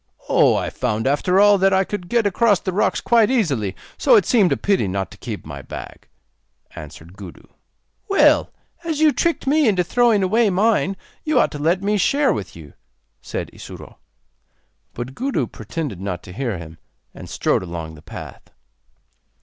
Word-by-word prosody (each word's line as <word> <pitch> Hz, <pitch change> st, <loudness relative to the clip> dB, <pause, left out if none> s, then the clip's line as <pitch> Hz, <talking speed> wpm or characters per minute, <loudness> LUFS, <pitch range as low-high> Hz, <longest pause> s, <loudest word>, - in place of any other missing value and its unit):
'Oh, -, -, +4 dB
I -, -, -2 dB
found 110 Hz, +1 st, -2 dB
after 150 Hz, +7 st, +2 dB
all 205 Hz, -1 st, +6 dB
that 195 Hz, +1 st, +3 dB
I 190 Hz, 0 st, +3 dB
could 185 Hz, -3 st, -6 dB
get 235 Hz, -2 st, +2 dB
across 205 Hz, 0 st, +3 dB
the 185 Hz, -, -4 dB
rocks 200 Hz, -, +1 dB
quite 230 Hz, -2 st, +3 dB
easily, 140 Hz, -, 0 dB, 0.2 s
so -, -, +5 dB
it 425 Hz, -, +4 dB
seemed 210 Hz, -9 st, +3 dB
a -, -, +1 dB
pity 195 Hz, -, +1 dB
not 95 Hz, 0 st, -3 dB
to -, -, -13 dB
keep 110 Hz, -4 st, -7 dB
my 70 Hz, -2 st, -8 dB
bag,' -, -, -10 dB, 0.7 s
answered 80 Hz, +3 st, -11 dB
Gudu. 95 Hz, -4 st, -11 dB, 0.6 s
'Well, 395 Hz, -, +4 dB, 0.3 s
as 320 Hz, -3 st, -3 dB
you 310 Hz, -1 st, +5 dB
tricked 335 Hz, +3 st, -1 dB
me 295 Hz, 0 st, +3 dB
into 190 Hz, -4 st, +2 dB
throwing 225 Hz, +2 st, +2 dB
away 215 Hz, +4 st, +2 dB
mine, 195 Hz, 0 st, +1 dB, 0.3 s
you 305 Hz, -5 st, +2 dB
ought -, -, +2 dB
to 145 Hz, -, -7 dB
let 170 Hz, +6 st, +1 dB
me 210 Hz, +1 st, +1 dB
share 280 Hz, +9 st, +2 dB
with 100 Hz, -4 st, -6 dB
you,' 75 Hz, -4 st, -12 dB, 0.5 s
said -, -, -5 dB
Isuro. -, -, -11 dB, 1.0 s
But 120 Hz, +2 st, -6 dB
Gudu 250 Hz, -, -1 dB
pretended 115 Hz, -, -6 dB
not 90 Hz, -3 st, -4 dB
to 90 Hz, -, -11 dB
hear 120 Hz, -3 st, -3 dB
him, 80 Hz, -1 st, -11 dB, 0.3 s
and -, -, -11 dB
strode -, -, 0 dB
along 85 Hz, -3 st, -6 dB
the 75 Hz, -, -14 dB
path. -, -, -10 dB
180 Hz, 175 wpm, -21 LUFS, -, 1.0 s, all